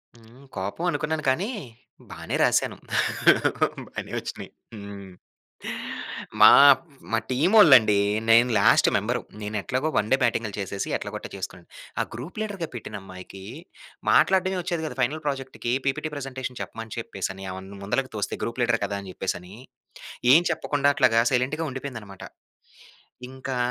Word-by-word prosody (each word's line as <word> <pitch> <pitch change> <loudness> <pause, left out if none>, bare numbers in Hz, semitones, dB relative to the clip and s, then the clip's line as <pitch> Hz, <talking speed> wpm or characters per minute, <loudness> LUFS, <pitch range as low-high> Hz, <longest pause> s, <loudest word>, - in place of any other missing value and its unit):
హ్మ్. 115 +4 -18
కోపం 100 - -3
అనుకున్నాను, 155 +1 -2
కానీ 185 - 0 0.6
బానే - - -5
రాశాను. - - +2 1.1
బానే - - -7
వచ్చినాయి. - - -7 0.3
హ్మ్. 100 -2 -9 1.3
మా, - - +11 0.6
మా - - +3
టీమ్ 150 - +1
వోల్లండి 130 - +8 0.3
నేను 120 +2 +6
last - - +5
member - - -1 0.2
నేనెట్లాగో 110 +8 -2
one 105 - +1
day 135 - +5
batting 115 -2 +1
చేసేసి, 100 0 -3
ఎట్లగోట్ట - - -6
చేసుకున్నాను. 95 -2 -7 0.3
ఆ - - +2
గ్రూప్ 140 - -7
లీడర్‌గా 200 -6 -4
పెట్టిన 120 - -6
అమ్మాయికి 95 0 -11 0.7
మాట్లాడడమే 190 0 +3
వచ్చేది 170 -2 -3
కాదు, 155 - -6
ఫైనల్ 150 +6 -1
ప్రాజెక్ట్‌కి 135 -3 -3
పీపీటీ 140 +3 -1
ప్రజెంటేషన్ 130 -2 -6
చెప్పమని 115 0 -7
చెప్పేసని, 95 -3 -5
ఆమె 95 0 -7 0.2
ముందలకి 130 +6 -1
తోస్తే, 105 - -3
గ్రూప్ 115 +2 -4
లీడర్ 115 -1 +2
కదా! 100 0 -3
అని 95 - -9
చెప్పేసని, 95 +1 -4 0.8
ఏం 170 - +6
చెప్పకుండా 145 -2 +1
అట్లాగా 115 -3 +4
సైలెంట్‌గా 135 +6 0
ఉండిపోయిందన్నమాట. 115 -8 -8 1.1
ఇంకా 130 -1 -5
125 Hz, 130 wpm, -25 LUFS, 105-145 Hz, 1.3 s, మా